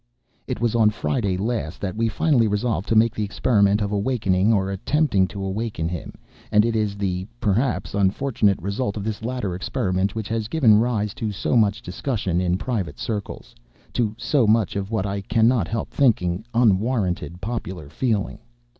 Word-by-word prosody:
It 125 - -3
was 120 -2 +1
on 110 -2 +4
Friday 105 -3 -1
last 105 -5 -2
that 95 -1 -3
we 115 +1 +1
finally 125 -2 +2
resolved 105 -1 -1
to 115 - +2
make 110 +1 +4
the 110 - -2
experiment 105 0 +2
of 100 - -2
awakening, 100 -2 +1
or 100 -3 +1
attempting 100 -1 +1
to 100 0 -6
awaken 95 -3 -2
him; 85 0 -6 0.4
and 105 0 +5
it 115 -1 0
is 105 -2 0
the 95 -2 -2
(perhaps) 120 +4 0
unfortunate 100 +1 +1
result 100 +5 -2
of 100 - -4
this 110 +1 -4
latter 120 -6 -2
experiment 95 0 -1
which 110 -3 -3
has 110 -1 -1
given 115 -6 +4
rise 110 -4 0
to 110 -2 -3
so 100 +5 -1
much 105 -3 +2
discussion 95 -2 -2
in 90 0 +1
private 105 -5 -3
circles—to 105 - -5
so 130 -4 +2
much 110 -3 +2
of 100 -1 -3
what 110 -4 -1
I 100 0 -2
cannot 110 0 +2
help 115 0 -3
thinking 105 -7 +1
unwarranted 105 -6 +1
popular 95 -8 -5
feeling. 105 - -1
105 Hz, 170 wpm, -23 LUFS, 95-115 Hz, 0.4 s, and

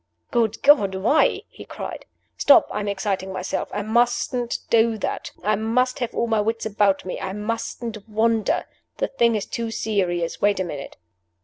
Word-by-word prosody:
"Good 230 -3 0
God 265 -10 +5
why?" 225 +11 +2
he - - -12
cried. - - -7 0.3
"Stop! 285 - +6
I - - -2
am 205 - -3
exciting 195 -1 -2
myself. 185 0 -3
I 205 +1 -3
mustn't 240 +2 +1
do 225 -1 +4
that. - - -3
I 215 +1 +2
must 250 +5 0
have 245 -2 -3
all 235 - +1
my 220 -2 +1
wits 225 +2 -2
about 205 -3 +1
me; 185 - -4
I 190 0 -4
mustn't 225 +1 -4
wander. 220 0 +1 0.3
The - - -1
thing 235 -4 +2
is 205 -2 -2
too 230 -1 -4
serious. 185 -6 -1
Wait 205 -1 +3
a - - +1
minute!" 145 -6 -7
220 Hz, 175 wpm, -23 LUFS, 200-235 Hz, 0.3 s, Stop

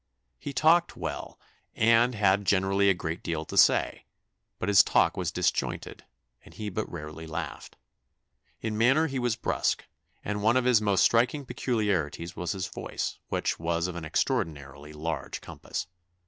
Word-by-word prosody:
He 145 - -5
talked 165 +4 +3
well, - - -5 0.4
and 115 +2 +4
had 100 -1 +3
generally 95 +1 +3
a 95 - +4
great 80 0 -4
deal 80 -2 -3
to - - -7
say; - - +4 0.5
but - - -4
his 100 -2 +7
talk - - +2
was - - -2
disjointed, - - -2 0.4
and - - -16
he 105 -1 -4
but 110 +4 -4
rarely 80 0 -7
laughed. 80 - -6 0.9
In 110 -1 -3
manner 135 +7 +4
he 135 -4 -2
was 120 -3 0
brusque, 110 - -1 0.4
and 105 0 -2
one 110 +4 +3
of 130 - +1
his 125 -4 +4
most 100 -3 +3
striking 125 +5 +2
peculiarities 95 - -1
was 90 +1 -2
his 95 -2 -3
voice, 100 - -5
which - - -1
was 85 +1 -1
of 90 -1 -4
an 85 - -6
extraordinarily 75 -2 -2
large 75 -1 -4
compass." - - -6
100 Hz, 160 wpm, -28 LUFS, 85-115 Hz, 0.9 s, his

